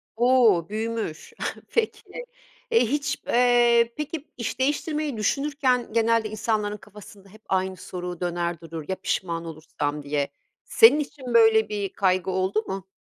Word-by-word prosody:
O, 235 -7 +4
büyümüş. 220 -6 -4 0.4
Peki, 460 -1 -1 0.7
e, 230 - +5
hiç, 285 +4 -1
eee, 240 -1 +4
peki, 300 0 -5
iş 235 0 -4
değiştirmeyi 295 0 -1
düşünürken, 260 0 0
genelde 230 -1 +2
insanların 215 -1 -1
kafasında 205 -1 -15
hep 215 +3 -17
aynı 190 0 0
soru 180 -1 -6
döner 175 -1 -2
durur, 165 -2 -7
ya, 190 - -1
pişman 170 -3 -3
olursam, 150 -2 -4
diye 145 0 -1 0.4
senin 450 -10 +6
için 265 -4 -5
böyle 225 -1 +5
bir 205 -2 -3
kaygı 185 -1 +1
oldu 190 +3 0
mu? 190 -1 -5
215 Hz, 135 wpm, -25 LUFS, 185-245 Hz, 0.7 s, senin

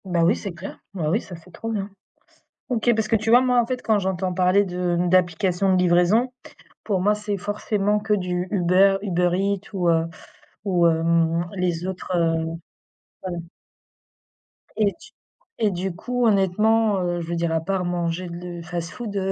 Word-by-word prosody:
Bah, 175 -3 +1
oui 175 +6 +4
c'est 195 -4 -6
clair! 170 +3 -9 0.2
Bah, 160 -5 -1
oui 215 - +1
ça 180 - -10
c'est 165 +2 -16
trop 225 +7 -6
bien. 205 -2 -3 0.8
OK, 240 -1 +1
parce 220 -1 0
que 225 - 0
tu 220 +1 -1
vois, 240 +2 +8
moi 250 -1 +3
en 235 - 0
fait 250 +1 -3
quand 220 -2 +2
j'entends 185 -1 -1
parler 185 +2 +3
de 180 -2 -1
d'applications 185 +1 +2
de - - +3
livraison, 180 +8 +3 0.5
pour 195 -4 0
moi 205 +3 +3
c'est 210 -1 -3
forcément 205 +1 -1
que 210 0 0
du 180 -2 -1
Uber, 195 +1 +4
UberEats 190 +1 +1
ou, 180 -3 +1
heu, 165 0 +2 0.6
ou, 175 -3 +3
hem, 165 +1 +2
les 180 -1 -1
autres, 190 0 -6
heu 165 -1 +1 0.8
ouais 175 -1 -4 1.4
et 205 -2 +2
tu - - -15 0.5
et 215 - +4
du 185 0 -3
coup, 245 +6 -1
honnêtement, 210 +1 +3
heu, 175 -1 -1
je 165 - -7
veux 170 - -2
dire, 170 0 -1
à 165 0 +1
part 185 +2 -1
manger 175 0 -2
de 170 - -7
le 175 -1 -7
fast-food, 175 +6 -5
heu, 195 -1 0
185 Hz, 180 wpm, -23 LUFS, 175-205 Hz, 1.4 s, vois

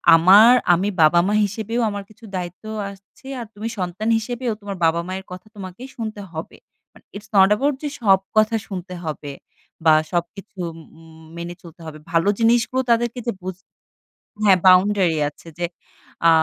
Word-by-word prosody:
আমার 200 +8 +7 0.2
আমি 190 +4 +1
বাবা-মা 175 +6 +4
হিসেবেও 220 +4 -3
আমার 205 -1 -5
কিছু 215 +2 -16
দায়িত্বও 185 +5 -6 0.2
আসছে, 200 +6 -17
আর 235 - -5
তুমি 215 +2 -5
সন্তান 185 +5 -2
হিসেবেও 240 +1 -3
তোমার 200 -2 -6
বাবা-মায়ের 175 +4 -1
কথা 180 +3 -9
তোমাকে 190 +1 -9
শুনতে 220 -3 -5
হবে। 160 0 -7 0.4
বাট - - -20
ইটস 210 +1 -9
নট 190 -1 +7
এবাউট 275 +5 0
যে 295 - -1
সব 195 -4 +5 0.2
কথা 215 +1 +4
শুনতে 185 -2 -7
হবে 150 -2 -5 0.5
বা 160 - +7 0.2
সবকিছু 190 +4 -4 0.4
উম 160 0 -16
মেনে 170 +1 -6
চলতে 170 0 -14
হবে। 155 -1 -8
ভালো 165 +4 +2
জিনিসগুলো 235 +3 +2
তাদেরকে 240 +1 +1
যে - - 0
বুঝ 185 -1 -5 0.9
হ্যাঁ, 195 -3 +6
বাউন্ডারি 185 -2 +4
আছে 150 - -20
যে, 175 - 0 0.6
আ - - +8
195 Hz, 155 wpm, -21 LUFS, 175-220 Hz, 0.9 s, আ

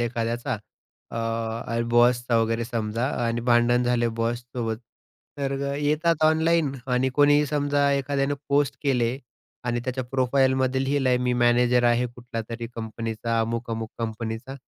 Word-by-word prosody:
एखाद्याचा. 120 0 -1 0.5
अ, 115 0 -3
बॉसचा 120 0 +3
वगैरे 115 +1 0
समजा 115 +1 -2 0.2
आणि 115 0 -1
भांडण 120 +1 +4
झाले 120 -1 +1
बॉससोबत. 120 -1 -2 0.6
तर 140 -1 -1 0.2
येतात 155 +2 +1
ऑनलाईन. 160 -1 +3
आणि 125 +1 +1
कोणीही 145 0 +5
समजा 145 -1 +1
एखाद्यानं 140 0 0
पोस्ट 140 0 +2
केले 125 -3 +1 0.5
आणि 120 -1 -1
त्याच्या 130 0 -2
प्रोफाईलमध्ये 130 +1 +1
लिहिलं 135 -1 +1
आहे 125 0 +3
मी 125 0 0
मॅनेजर 120 0 +3
आहे 120 +1 +3
कुठल्यातरी 120 -1 -6
कंपनीचा. 115 0 -3
अमुक-अमुक 115 -1 -3
कंपनीचा. 115 +2 -4
120 Hz, 125 wpm, -25 LUFS, 115-135 Hz, 0.6 s, कोणीही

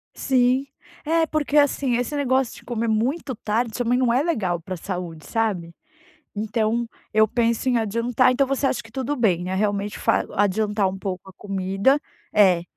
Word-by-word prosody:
Sim, 260 0 +2 0.4
é 325 +1 +2
porque 305 -2 -1
assim, 280 -3 +3
esse 245 +4 -2
negócio 265 -3 +1
de - - -15
comer 235 -1 -2
muito 255 +6 0
tarde, 220 +2 -1
também 245 +1 0
não 250 -2 +2
é 255 - +3
legal 195 - -1
pra 185 +2 -6
saúde, 175 -3 -6
sabe. 190 -7 -1 0.6
Então 220 +2 0 0.3
eu 215 0 +5
penso 235 +2 0
em 250 - +3
adiantar, 230 +3 +2
então 275 +2 +2
você 275 +1 0
acha 265 - 0
que 225 - -16
tudo 265 +3 -2
bem 195 -9 +2
né 185 +1 -3
realmente 205 +1 -1
fa - - +2
adiantar 205 0 +1
pouco 190 -1 -5
a - - -12
comida, 195 +7 +1 0.3
é, 185 -5 +5
225 Hz, 170 wpm, -23 LUFS, 200-255 Hz, 0.6 s, eu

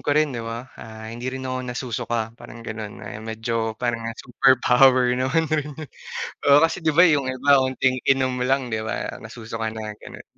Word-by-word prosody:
ko - - 0
rin 155 -2 +3
'di 120 - -4
ba, 115 +2 -5 0.2
ah, 110 0 -9
hindi 120 +2 -5
rin 130 0 -5
ako 130 0 -2
nasusuka 125 -1 -3 0.2
parang 115 -1 -11
gano'n. 110 -1 -6
Ayan 105 +1 -8
medyo 110 0 -2
parang, 120 0 -1
ah, 115 - -6
super 130 +2 +3
power 125 0 +5
naman. 130 +6 +1 1.0
Oo, 140 +1 +8
kasi 165 +1 0
'di 160 - +3
ba 170 +4 +6
'yung 145 -4 +2
iba 140 +2 +4
onting 130 0 +1
inom 130 -1 +2
lang 130 0 +1
'di 110 -1 -2
ba 110 - -3
nasusuka 115 0 -5
na 110 -1 -6
gano'n. - - -11
125 Hz, 185 wpm, -23 LUFS, 115-130 Hz, 1.0 s, Oo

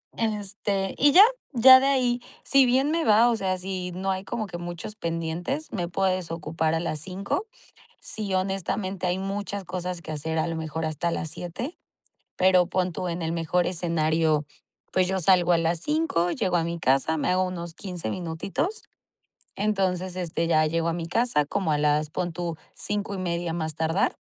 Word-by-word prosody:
Este, 205 -3 -1
y 285 +1 +6
ya, 375 +7 +9 0.3
ya 260 +2 +9
de 270 - +1
ahí, 250 -3 +2 0.2
si 275 -2 +5
bien 265 +4 +2
me 330 0 +1
va. 225 +3 +5
O - - +1
sea, 190 -3 -1
si 185 -1 -4
no 190 +1 -1
hay 190 0 -3
como 215 +2 -3
que 175 -3 -7
muchos 175 +4 -6
pendientes, 170 - -3
me 175 -4 -2
puedes 185 -1 0
ocupar 160 -1 -1
a - - 0
las 160 -2 -2
5. 195 - -3 0.5
Sí, 205 -3 -3
honestamente, 190 0 -2
hay 180 +1 0
muchas 200 0 -4
cosas 180 0 -4
que 160 - -7
hacer, 160 +2 -2
a 160 - 0
lo 165 - -3
mejor 160 0 -3
hasta 160 +2 -1
las 160 - -2
7. 180 - -6 0.6
Pero 185 -1 +4
pon 185 -1 -1
tú 180 +1 -3
en 170 +1 -3
el 165 +1 -1
mejor 170 +1 +1
escenario. 160 -3 +1 0.5
Pues 185 -1 +3
yo 190 0 0
salgo 180 0 +4
a 170 - +5
las 165 0 0
5 295 - +1
llego 185 -6 0
a 165 - +2
mi 170 +1 -3
casa, 135 +3 +2
me - - -1
hago 185 +1 +3
unos 175 -2 -5
15 175 - -5
minutitos. 185 - -3 0.7
Entonces 190 -3 0
este 170 -2 -2
ya 155 -2 +4
llego 165 +1 0
a 165 - -1
mi 165 -1 -4
casa 195 -5 +2
como 175 +2 -1
a 150 - +1
las 150 0 +1
pon 175 -1 -2
tú 170 -1 -3 0.2
5 205 -1 -2
y - - -5
media 175 -2 -2
a - - -3
más 160 -2 -2
tardar. 165 +4 0
180 Hz, 195 wpm, -26 LUFS, 165-195 Hz, 0.7 s, ya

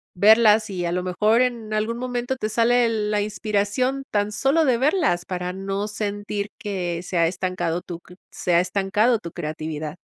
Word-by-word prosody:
verlas. 215 +2 +5
Y 180 -2 -3
a 170 - -1
lo 180 +1 -1
mejor 210 +6 +2
en 235 -4 -1
algún 220 +2 -1
momento 245 0 -2
te 215 -3 -3
sale 235 +2 +3
la 210 -2 0
inspiración 210 +5 -1
tan 205 0 0
solo 280 +9 +2
de 255 -4 +3
verlas 285 - +1
para 180 -1 -4
no 195 +2 -3
sentir 205 -1 -3
que 180 -4 -3
se 180 0 -3
ha 165 - +4
estancado 180 -1 -2
tu 175 -2 -8
cr 180 - -17 0.2
se 175 - 0
ha - - +6
estancado 205 +5 +1
tu 170 - -7
creatividad. 155 +1 -5
205 Hz, 180 wpm, -23 LUFS, 180-230 Hz, 0.2 s, ha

